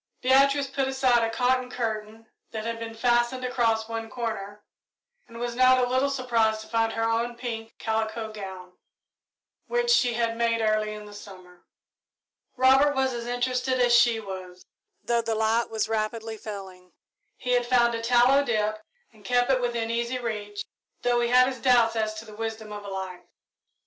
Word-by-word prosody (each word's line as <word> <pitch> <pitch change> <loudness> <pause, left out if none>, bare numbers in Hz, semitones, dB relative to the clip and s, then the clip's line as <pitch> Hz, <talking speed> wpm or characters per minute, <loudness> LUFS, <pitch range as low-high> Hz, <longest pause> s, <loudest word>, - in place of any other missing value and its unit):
Beatrice 275 +2 +4
pulled 270 0 -2
aside 260 -3 +2
a 225 - +1
cotton 250 +2 +1
curtain 220 -2 -4 0.2
that 220 -1 -6
had 230 0 -3
been 225 0 -6
fastened 240 +2 +1
across 230 -3 0
one 225 0 -5
corner, 210 -3 -5 0.6
and 230 - -12
was 240 0 -3
not 255 +1 +5
a 250 -1 +2
little 260 +3 +1
surprised 230 -5 +1
to 220 - -11
find 225 0 0
her 225 - -1
own 230 +1 -1
pink 230 -2 -6
calico 220 0 -2
gown, 190 -3 -8 1.0
which 480 0 +1
she 245 - +3
had 230 -1 0
made 230 -1 +1
early 215 -1 +1
in 210 0 -8
the 205 - -12
summer. 185 -3 -13 0.9
Robert 270 +3 +5
was 265 -1 +1
as 235 0 -5
interested 250 +1 -1
as 245 -1 +4
she 235 -1 +4
was, 185 -3 -9 0.4
though 235 0 +1
the 225 -1 -2
light 220 +2 +1
was 220 -1 -1
rapidly 220 0 -2
failing. 190 -4 -9 0.4
He 250 - -3
had 245 -1 +2
found 240 -1 +3
a 230 - -3
tallow 245 +4 +4
dip 215 -4 -1 0.3
and 215 -2 -20
kept 245 +4 +2
it 255 -1 +2
within 235 -2 -1
easy 235 +2 -1
reach, 210 -4 -5 0.4
though 245 0 +2
he 235 0 +1
had 250 +1 +6
his 260 -1 -4
doubts 235 -3 +4
as 215 -1 -1
to 220 +1 -8
the 215 - -12
wisdom 220 -1 -5
of 205 0 -7
a 200 - -7
light. 190 -2 -6
230 Hz, 180 wpm, -26 LUFS, 220-250 Hz, 1.0 s, had